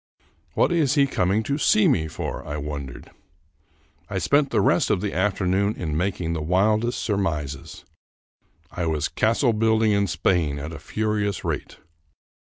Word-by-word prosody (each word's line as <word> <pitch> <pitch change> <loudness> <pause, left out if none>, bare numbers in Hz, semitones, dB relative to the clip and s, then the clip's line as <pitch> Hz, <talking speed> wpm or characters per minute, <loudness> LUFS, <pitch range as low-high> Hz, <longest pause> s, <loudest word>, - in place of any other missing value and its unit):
What - - +3
is 155 -5 +2
he 140 -2 +5
coming 100 -4 0
to 140 +5 -2
see 215 +5 +4
me 85 - +2
for? 80 - -5
I 75 - -5
wondered. 70 -4 -7 1.0
I 100 - -3
spent 140 - +2
the - - +1
rest - - +2
of - - +2
the 100 +1 -3
afternoon 95 +1 +1
in 80 -4 -3
making 90 -1 -1
the 80 - -3
wildest 105 +8 +1
surmises. 85 - -3 0.9
I 85 -2 -3
was 80 -2 0
castle 115 +3 +1
building 110 0 +2
in 100 -1 +2
Spain 80 -4 0
at 75 +3 -6
a - - -8
furious 105 -2 -2
rate. - - -4
100 Hz, 155 wpm, -24 LUFS, 80-110 Hz, 1.0 s, he